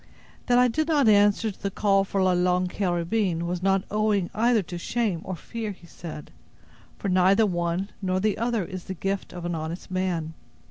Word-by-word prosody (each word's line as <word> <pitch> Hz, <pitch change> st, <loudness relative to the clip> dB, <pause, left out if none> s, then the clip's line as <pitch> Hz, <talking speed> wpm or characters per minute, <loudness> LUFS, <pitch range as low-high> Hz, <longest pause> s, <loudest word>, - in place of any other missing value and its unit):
"That 245 Hz, -1 st, +4 dB
I 250 Hz, 0 st, +6 dB
did 310 Hz, +6 st, 0 dB
not 295 Hz, -6 st, +3 dB
answer 205 Hz, +1 st, +4 dB
to -, -, -18 dB
the 200 Hz, -, -1 dB
call 195 Hz, 0 st, +2 dB
for 195 Hz, 0 st, -1 dB
La 185 Hz, -, +4 dB
Longue 180 Hz, 0 st, +2 dB
Carabine, 175 Hz, -1 st, 0 dB
was 175 Hz, 0 st, -3 dB
not 195 Hz, 0 st, +2 dB
owing 210 Hz, -3 st, +1 dB
either 230 Hz, -1 st, +3 dB
to 175 Hz, 0 st, -7 dB
shame 210 Hz, -4 st, -1 dB
or 185 Hz, -, -4 dB
fear," 225 Hz, +6 st, -5 dB
he 180 Hz, -, -18 dB
said, 165 Hz, -3 st, -9 dB, 0.7 s
"for -, -, -4 dB
neither 190 Hz, +3 st, +4 dB
one 175 Hz, +1 st, -1 dB
nor 185 Hz, -1 st, 0 dB
the 210 Hz, +1 st, 0 dB
other 230 Hz, -4 st, 0 dB
is 185 Hz, -1 st, -7 dB
the 190 Hz, -, -5 dB
gift 195 Hz, +2 st, -3 dB
of 175 Hz, -1 st, -7 dB
an 175 Hz, -, -2 dB
honest 165 Hz, +3 st, -5 dB
man. 180 Hz, -4 st, -1 dB
190 Hz, 195 wpm, -26 LUFS, 175-215 Hz, 0.7 s, I